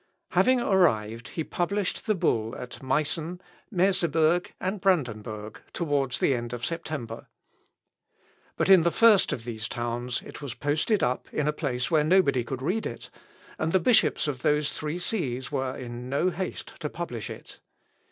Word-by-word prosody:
Having 255 -1 +4
arrived 115 - +2
he 160 - -3
published 190 +6 -2
the 215 - +3
bull 115 - 0
at 125 0 -8
Meissen, 155 +6 -1 0.3
Merseburg, 175 -3 +2
and 190 +1 -2
Brandenburg 110 - -1
towards 140 -6 0
the 140 - +3
end 120 -1 -3
of 120 0 -3
September. 155 -9 -5 1.3
But - - +1
in 190 -2 +8
the 170 - +3
first 215 +1 +5
of 115 - -3
these 110 -2 -4
towns 120 +1 -3
it - - -10
was 140 -5 -5
posted 155 +9 +1
up 125 +1 -1
in 150 - 0
a 150 - +2
place 130 -3 -2
where 155 -2 +4
nobody 155 -7 +4
could 130 +2 -5
read 200 +9 0
it; - - -9 0.5
and 160 +1 0
the 190 - +5
bishops 220 -3 +3
of 135 -4 -3
those 150 +1 +2
three 155 +2 -3
sees 140 - -2
were 130 -2 -2
in 120 0 -7
no 155 +7 +1
haste 180 +2 -5
to 150 - -3
publish 125 -11 -5
it. - - -10
150 Hz, 160 wpm, -27 LUFS, 125-175 Hz, 1.3 s, in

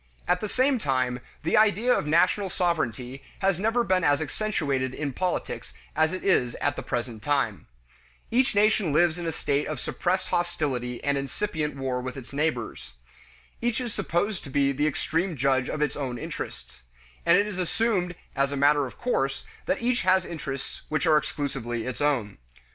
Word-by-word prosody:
At 180 0 +2
the 215 - -2
same 260 +2 +2
time, 130 - 0 0.2
the 160 - +2
idea 220 +3 +4
of 150 - 0
national 180 +5 +3
sovereignty 135 -8 -1 0.2
has 190 -3 +1
never 225 +4 +2
been 185 -4 +2
as 145 -2 +4
accentuated 145 -7 -1
in 145 -3 -3
politics 180 +5 -3 0.2
as 160 +1 +3
it 185 - -4
is 125 -11 +2
at - - 0
the - - -4
present 120 -2 -3
time. 135 -8 0 0.6
Each 250 0 +3
nation 205 -6 +3
lives 170 +2 +3
in 170 - -3
a - - 0
state 145 -1 0
of - - -3
suppressed - - -1
hostility 140 -8 -1
and 140 -1 +1
incipient 150 +1 -2
war 130 -2 -2
with 130 +1 -5
its 130 +1 -10
neighbors. 140 - -2 0.7
Each 240 0 +1
is 240 -4 -3
supposed 190 +3 -1
to - - -8
be 140 +1 +2
the 145 +3 +1
supreme 165 +4 -1
judge 130 -1 +2
of 150 - 0
its 145 -2 -1
own 130 -4 -3
interests, 115 - -7 0.4
and 170 +1 +6
it 200 - +3
is 205 -3 -5
assumed 180 -1 0 0.2
as 140 0 +1
matter 145 0 +4
of - - -12
course 135 - -1 0.2
that - - 0
each 240 0 +2
has 185 0 +3
interests 140 -4 -5
which 155 +3 0
are 155 -2 +6
exclusively 135 -6 -2
its 130 +1 -4
own. 120 - 0
150 Hz, 175 wpm, -27 LUFS, 135-185 Hz, 0.7 s, and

